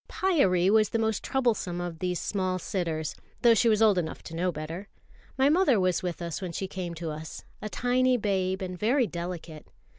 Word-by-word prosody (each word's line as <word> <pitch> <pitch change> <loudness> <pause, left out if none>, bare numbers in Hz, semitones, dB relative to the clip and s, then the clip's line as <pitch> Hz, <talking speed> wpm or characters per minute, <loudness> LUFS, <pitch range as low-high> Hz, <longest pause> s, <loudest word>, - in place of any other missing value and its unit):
Pyârie 195 - +3
was 215 -1 +4
the - - 0
most 220 -2 0
troublesome 225 -9 0
of 175 -2 -5
these 180 -1 -1
small 185 -2 -1
sitters, 170 -5 -2 0.3
though 235 -1 +7
she 230 +1 +3
was 220 0 +4
old 205 -4 +5
enough 160 -2 -5
to 165 - -8
know 180 +2 0
better. 165 +5 -6 0.5
My 265 +1 +4
mother 300 - +4
was 185 -2 +1
with 175 -1 -4
us 170 +2 -4
when 180 -3 -4
she 190 - -3
came 180 -3 -5
to 165 -1 -4
us, 155 0 -7 0.2
a 215 - -4
tiny 250 +2 +2
babe 190 -3 -1
and 185 -1 -4
very 245 +4 +3
delicate. 170 -4 -6
185 Hz, 200 wpm, -28 LUFS, 175-225 Hz, 0.5 s, though